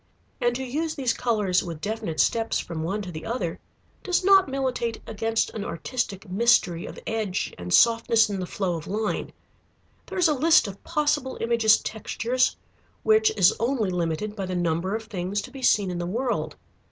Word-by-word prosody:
And 240 Hz, 0 st, +2 dB
to 265 Hz, -, -3 dB
use 310 Hz, +5 st, -2 dB
these 255 Hz, -5 st, 0 dB
colors 210 Hz, -7 st, +1 dB
with 170 Hz, -3 st, -6 dB
definite 200 Hz, -6 st, -4 dB
steps 225 Hz, +9 st, +2 dB
from 165 Hz, -2 st, -4 dB
one 195 Hz, +6 st, -2 dB
to 180 Hz, -, -7 dB
the 155 Hz, -1 st, -7 dB
other 205 Hz, -8 st, -3 dB, 0.4 s
does 365 Hz, 0 st, 0 dB
not 385 Hz, -4 st, +6 dB
militate 255 Hz, -4 st, -2 dB
against 225 Hz, +1 st, -1 dB
an 215 Hz, -, -5 dB
artistic 200 Hz, -, -4 dB
mystery 185 Hz, -4 st, +2 dB
of -, -, -9 dB
edge 215 Hz, -4 st, -2 dB
and 90 Hz, 0 st, -6 dB
softness 230 Hz, -, +5 dB
in 200 Hz, -2 st, -3 dB
the 180 Hz, -, -4 dB
flow 185 Hz, -2 st, -2 dB
of 155 Hz, -, -9 dB
line. 210 Hz, +2 st, -2 dB, 0.8 s
There -, -, -6 dB
is 360 Hz, -2 st, +4 dB
a 305 Hz, -, +3 dB
list 315 Hz, -1 st, +4 dB
of 200 Hz, 0 st, -9 dB
possible 295 Hz, -3 st, 0 dB
Imagist 230 Hz, -2 st, +3 dB
textures 235 Hz, +3 st, 0 dB, 0.5 s
which 435 Hz, 0 st, +4 dB
is 180 Hz, -, +6 dB
only 230 Hz, -4 st, 0 dB
limited 180 Hz, +4 st, -2 dB
by 195 Hz, -3 st, -4 dB
the 185 Hz, -, -3 dB
number 175 Hz, +3 st, 0 dB
of 225 Hz, -, -4 dB
things 200 Hz, -2 st, -3 dB
to 255 Hz, -, -10 dB
be 270 Hz, 0 st, -9 dB
seen 205 Hz, -6 st, +3 dB
in 175 Hz, -, -4 dB
the 175 Hz, -, -3 dB
world. 205 Hz, -, -2 dB
220 Hz, 185 wpm, -25 LUFS, 180-250 Hz, 0.8 s, not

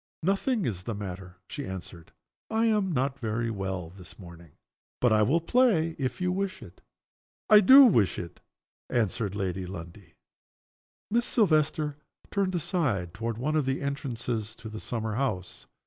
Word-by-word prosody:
"Nothing 200 Hz, +4 st, +1 dB
is 95 Hz, -6 st, -2 dB
the 110 Hz, +3 st, -4 dB
matter," 95 Hz, -2 st, -7 dB
she 145 Hz, -, -6 dB
answered. 90 Hz, -3 st, -8 dB, 0.4 s
"I 225 Hz, +1 st, +1 dB
am 210 Hz, -4 st, +2 dB
not 135 Hz, -1 st, -1 dB
very 115 Hz, 0 st, -2 dB
well 95 Hz, -4 st, -4 dB
this 95 Hz, +1 st, -13 dB
morning. 85 Hz, -5 st, -13 dB, 0.5 s
But 125 Hz, -3 st, +3 dB
I 110 Hz, -, +4 dB
will 135 Hz, +11 st, +3 dB
play 170 Hz, -5 st, +2 dB
if 130 Hz, -2 st, -2 dB
you 180 Hz, 0 st, 0 dB
wish 195 Hz, 0 st, -3 dB
it." -, -, -14 dB, 0.7 s
"I 210 Hz, -, +10 dB
do 265 Hz, +7 st, +9 dB
wish 115 Hz, -, +3 dB
it," 85 Hz, -, -7 dB, 0.5 s
answered 110 Hz, -3 st, 0 dB
Lady 95 Hz, -2 st, -3 dB
Lundie. 85 Hz, -1 st, -10 dB, 1.0 s
Miss 235 Hz, +2 st, +2 dB
Silvester 155 Hz, -, +2 dB, 0.3 s
turned 195 Hz, -2 st, 0 dB
aside 130 Hz, -, -1 dB
toward 115 Hz, 0 st, -4 dB
one 150 Hz, +6 st, -1 dB
of 150 Hz, -4 st, +1 dB
the 135 Hz, 0 st, 0 dB
entrances 120 Hz, -6 st, -3 dB
into 110 Hz, -, -9 dB
the 110 Hz, 0 st, -7 dB
summer 110 Hz, -2 st, -3 dB
house. 105 Hz, -7 st, -3 dB
120 Hz, 155 wpm, -28 LUFS, -, 1.0 s, I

